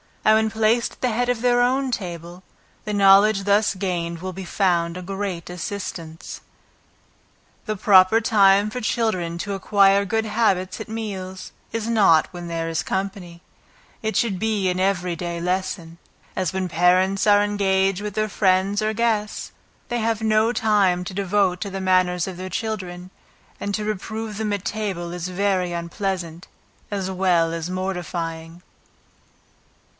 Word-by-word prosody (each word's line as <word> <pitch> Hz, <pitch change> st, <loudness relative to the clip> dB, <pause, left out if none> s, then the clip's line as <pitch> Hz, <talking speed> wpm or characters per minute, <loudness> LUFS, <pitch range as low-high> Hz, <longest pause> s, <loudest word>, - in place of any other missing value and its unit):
And 215 Hz, -, +6 dB
when 220 Hz, 0 st, +2 dB
placed 225 Hz, +2 st, +1 dB
at -, -, -21 dB
the 255 Hz, -, +1 dB
head 245 Hz, +3 st, 0 dB
of 245 Hz, -2 st, 0 dB
their 245 Hz, 0 st, +3 dB
own 260 Hz, +2 st, +1 dB
table, 175 Hz, -3 st, -6 dB, 0.4 s
the 210 Hz, -, -3 dB
knowledge 200 Hz, +1 st, +5 dB
thus 205 Hz, +1 st, +2 dB
gained 175 Hz, -3 st, -3 dB
will 185 Hz, +2 st, -5 dB
be 190 Hz, +1 st, -7 dB
found 170 Hz, -2 st, +1 dB
a -, -, -6 dB
great 190 Hz, -2 st, -4 dB
assistance. 175 Hz, -3 st, -6 dB, 1.2 s
The 215 Hz, -, -2 dB
proper 190 Hz, +1 st, +5 dB
time 200 Hz, -2 st, +4 dB
for 250 Hz, +3 st, -5 dB
children 200 Hz, -7 st, -1 dB
to 200 Hz, +2 st, -3 dB
acquire 195 Hz, 0 st, +3 dB
good 220 Hz, +3 st, 0 dB
habits 205 Hz, -4 st, 0 dB
at 220 Hz, -, -7 dB
meals, 190 Hz, -4 st, -6 dB, 0.2 s
is 225 Hz, -1 st, -3 dB
not 200 Hz, -9 st, +4 dB
when 175 Hz, -1 st, -7 dB
there 165 Hz, -1 st, -3 dB
is 165 Hz, -, -1 dB
company; 190 Hz, -3 st, -4 dB, 0.6 s
it 220 Hz, 0 st, -2 dB
should 205 Hz, -6 st, +1 dB
be 210 Hz, -3 st, 0 dB
an 180 Hz, 0 st, -1 dB
every 180 Hz, -2 st, 0 dB
day 170 Hz, 0 st, -4 dB
lesson. 175 Hz, -1 st, -3 dB, 0.4 s
As 185 Hz, -3 st, -1 dB
when 190 Hz, -1 st, -1 dB
parents 185 Hz, +4 st, +2 dB
are 205 Hz, 0 st, +6 dB
engaged 195 Hz, -2 st, +1 dB
with 210 Hz, -1 st, -4 dB
their 215 Hz, 0 st, 0 dB
friends 195 Hz, +1 st, +2 dB
or 215 Hz, 0 st, 0 dB
guests, 220 Hz, -2 st, -1 dB, 0.4 s
they 240 Hz, -, -1 dB
have 225 Hz, -1 st, 0 dB
no 220 Hz, +1 st, +3 dB
time 205 Hz, -6 st, +2 dB
to 185 Hz, -, -6 dB
devote 195 Hz, -1 st, +1 dB
to 200 Hz, -, -3 dB
the 195 Hz, 0 st, -5 dB
manners 185 Hz, -1 st, +2 dB
of 185 Hz, -2 st, -6 dB
their 185 Hz, +1 st, -6 dB
children, 185 Hz, -3 st, -5 dB, 0.5 s
and 205 Hz, -, -3 dB
to 215 Hz, -, -3 dB
reprove 215 Hz, +1 st, -4 dB
them 215 Hz, -1 st, -1 dB
at 200 Hz, -1 st, -4 dB
table 190 Hz, -5 st, -3 dB
is 180 Hz, 0 st, -4 dB
very 185 Hz, -1 st, 0 dB
unpleasant, 170 Hz, 0 st, -4 dB, 0.4 s
as 195 Hz, -2 st, -3 dB
well 180 Hz, -3 st, +2 dB
as 165 Hz, +1 st, -4 dB
mortifying. 175 Hz, -2 st, -4 dB
195 Hz, 160 wpm, -22 LUFS, 180-215 Hz, 1.2 s, And